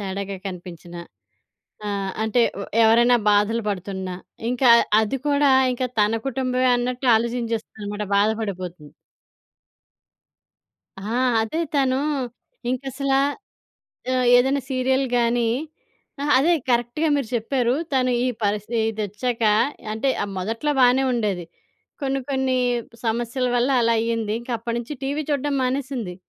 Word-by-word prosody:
తేడాగా 195 0 -4
కనిపించిన, 175 -2 -8 0.9
ఆహ్, 200 -1 -2
అంటే 220 +2 +2 0.2
వ్ - - -5 0.2
ఎవరైనా 235 +2 +5
బాధలు 210 +3 +2
పడుతున్నా, 190 -1 -4 0.4
ఇంకా 250 0 +3 0.3
అది 220 +5 -1
కూడా 285 0 +3 0.2
ఇంకా 255 +1 -2
తన 210 +2 +2
కుటుంబమే 255 0 0
అన్నట్టు 250 +1 -2
ఆలోచింజేస్తుందన్నమాట, 225 -3 -3
బాధ 205 +2 +4
పడిపోతుంది. 180 -7 -6 2.1
ఆ! - - -9 0.4
అదే 225 +9 -2
తను 265 -2 +2 0.7
ఇంకసల 270 +1 -2 1.0
ఆహ్, 255 -1 +1
ఏదైనా 265 +2 +2
సీరియల్ 260 +1 +1
గాని 235 0 +2 0.7
ఆహా! 290 - -1
అదే 315 +6 +3 0.2
కరెక్ట్‌గా 240 +7 +1
మీరు 275 -5 -2
చెప్పారు. 240 +1 0 0.2
తను 255 -1 +2
ఈ - - +1
పరిసి 210 +3 -1
ఇదొచ్చాక 220 +3 -3 0.5
అంటే 220 +5 0
ఆహ్, 200 - -6
మొదట్లో 225 +10 -1
బానే 255 +1 +5
ఉండేది. 205 -7 -1 0.6
కొన్ని 270 0 0
కొన్ని 265 -1 +1 0.5
సమస్యల 235 +3 -1
వల్ల 245 +3 +2
అలా 230 0 +3
అయింది, 225 -2 -1
ఇంకప్పడినుంచి 235 +2 -4
టీవీ 285 +3 -1
చూడ్డం 285 0 0
మానేసింది. 255 -6 -2
235 Hz, 115 wpm, -23 LUFS, 210-260 Hz, 2.1 s, ఎవరైనా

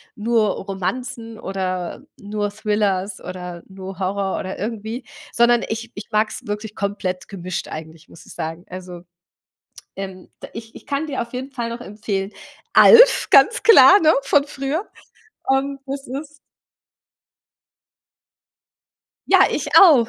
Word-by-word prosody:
nur 220 0 +1
Romanzen 225 +5 -5
oder 185 -3 -4 0.2
nur 205 0 -3
Thrillers 205 -2 -1
oder 180 -1 -8
nur 190 0 -9
Horror 195 0 -1
oder 185 - -5
irgendwie“, 225 +3 -5 0.3
sondern 235 0 +4
ich 225 +1 -5
ich 205 - -8
mag's 215 0 -1
wirklich 210 +1 -5
komplett 200 -3 -3
gemischt 185 -2 -5
eigentlich 160 +1 -9
muss - - -16
ich - - -12
sagen. 165 +2 -5
Also, 180 -1 -8 0.9
ähm, 190 -1 -8 0.2
ich 225 0 -10
ich - - -13
kann 285 +2 -2
dir 280 -3 -3
auf 235 0 -7
jeden 260 +2 -6
Fall 240 -3 -4
noch 235 +1 -6
empfehlen, 205 -2 -4 0.4
„Alf“, - - +7
ganz 335 +12 +5
klar, 415 -3 +8
ne? 315 0 +5
Von 280 +1 +3
früher, 285 +6 -4 0.6
ähm, 275 +1 0
das 275 +1 -5
ist 280 +4 -6 3.0
Ja, - - +6
ich - - -2
auch. 285 -11 +7
215 Hz, 130 wpm, -21 LUFS, 190-255 Hz, 3.0 s, klar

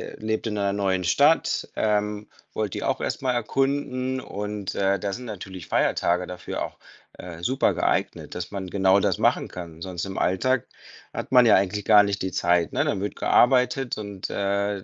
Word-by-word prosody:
ihr - - -18
lebt 110 +1 -2
in 105 - -2
einer 100 -1 +1
neuen 95 -2 0
Stadt, 145 - +3
ähm, 105 0 -1 0.2
wollt 105 -3 -2
die - - -4
auch - - -1
erst - - -2
mal 130 -1 +1
erkunden 130 +1 -1
und, 105 -2 -5
äh, 100 0 +1
da 100 +1 -2
sind 125 +4 -7
natürlich 95 -6 -8
Feiertage 90 +1 +1
dafür 90 -1 -6
auch, - - -5 0.4
äh, 85 -2 -9
super 130 +9 +1
geeignet, - - -1
dass 90 -1 -5
man 100 -2 -5
genau 95 +1 +3
das - - +1
machen - - +2
kann. 85 -2 -9
Sonst 90 -1 -4
im 95 -1 -5
Alltag 130 +7 +1 0.4
hat - - -6
man 125 -2 +7
ja 110 - +7
eigentlich 100 +2 0
gar 105 -2 +7
nicht 100 0 -2
die 95 - -2
Zeit, 85 -1 +1
ne? - - 0
Dann 95 - -1
wird 100 - -3
gearbeitet 125 +1 +3
und, 100 -3 -6
äh, 100 0 -1
100 Hz, 190 wpm, -25 LUFS, 95-115 Hz, 0.4 s, man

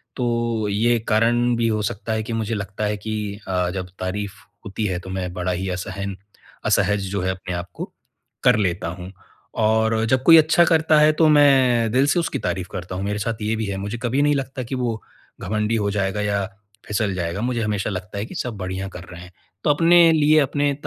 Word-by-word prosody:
तो 115 -3 -1
ये 115 +3 +2
कारण 120 +2 +3
भी 115 0 +1
हो 110 -1 0
सकता 110 +2 -5
है 110 0 -1
कि 115 - -5
मुझे 115 0 -2
लगता 100 +1 -5
है 105 0 -1
कि 105 -1 -4
अ, 90 -1 0
जब 95 -1 -4
तारीफ़ 100 +2 -3 0.3
होती 105 +1 -3
है 90 -3 -1
तो 95 - -10
मैं 95 -1 -3
बड़ा 90 0 -2
ही 95 +2 -3
असहन 95 +2 -4 0.5
असहज 105 -2 +2
जो 100 -2 -1
है 95 - 0
अपने 95 -1 -6
आपको 85 0 -7 0.5
कर - - +5
लेता 90 -4 -1
हूँ। 90 +2 -7 0.5
और 110 +1 +2
जब 130 0 +2
कोई 165 +1 +8
अच्छा 160 +2 +5
करता 160 -2 +3
है 150 +1 +6
तो 160 - +6
मैं 130 -6 +4
दिल 130 +4 +3
से 160 - +2
उसकी 170 - -2
तारीफ़ 90 +1 -3
करता 90 +1 -6
हूँ, 95 - -3
मेरे 105 +1 -2
साथ 110 +1 -3
ये 110 +1 0
भी 110 0 -2
है 100 -1 -3
मुझे 100 +4 -4
कभी 130 +4 +1
नहीं 145 0 +3
लगता 130 -1 -4
कि 125 +3 -5
वो 120 -3 -2 0.4
घमंडी 105 +3 -1
हो 105 -2 0
जाएगा 100 0 -1
या 100 -1 0 0.4
फिसल 105 -1 -1
जाएगा, 85 +2 -3
मुझे 120 -1 -1
हमेशा 105 -1 -1
लगता 95 0 -6
है 100 - -2
कि - - -10
सब 120 -4 -4
बढ़िया 95 +1 -4
कर 90 -2 -9
रहे 90 0 -9
हैं। 90 - -12 0.3
तो - - +1
अपने 165 +2 +6
लिए 155 0 +4
अपने 145 0 +1
105 Hz, 215 wpm, -22 LUFS, 95-120 Hz, 0.5 s, कोई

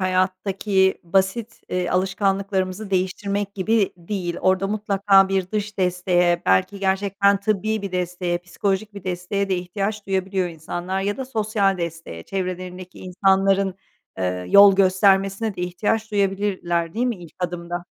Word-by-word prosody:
hayattaki 190 +1 +1
basit, 195 +6 0
eee, 180 -1 -1
alışkanlıklarımızı 195 +1 -1
değiştirmek 200 +2 -1
gibi 205 +1 +1
değil. 175 -1 -4
Orada 185 +1 +2
mutlaka 200 -2 +3
bir 190 -1 -1
dış 210 -1 -3
desteğe, 180 -1 +2
belki 95 - +2
gerçekten 200 +1 +2
tıbbi 215 +1 -1
bir 200 -2 -5
desteğe, 180 -1 -1
psikolojik 195 +3 -2
bir 200 - -9
desteğe 185 +2 -2
de 190 - +1
ihtiyaç 200 +4 -3
duyabiliyor 190 -1 -1
insanlar. 175 +3 -4
Ya 205 +1 -1
da 265 - -4
sosyal 210 -5 0
desteğe, 165 - -5
çevrelerindeki 185 - -5
insanların, 195 +1 +2 0.4
eee, 90 -1 -2
yol 200 -1 +8
göstermesine 195 +2 +3
de - - -5
ihtiyaç 215 +5 -1
duyabilirler, 195 -4 -1
değil 240 +3 0
mi 240 -3 -1
ilk 175 -3 -13
adımda? 175 -1 -4
190 Hz, 135 wpm, -22 LUFS, 180-200 Hz, 0.4 s, yol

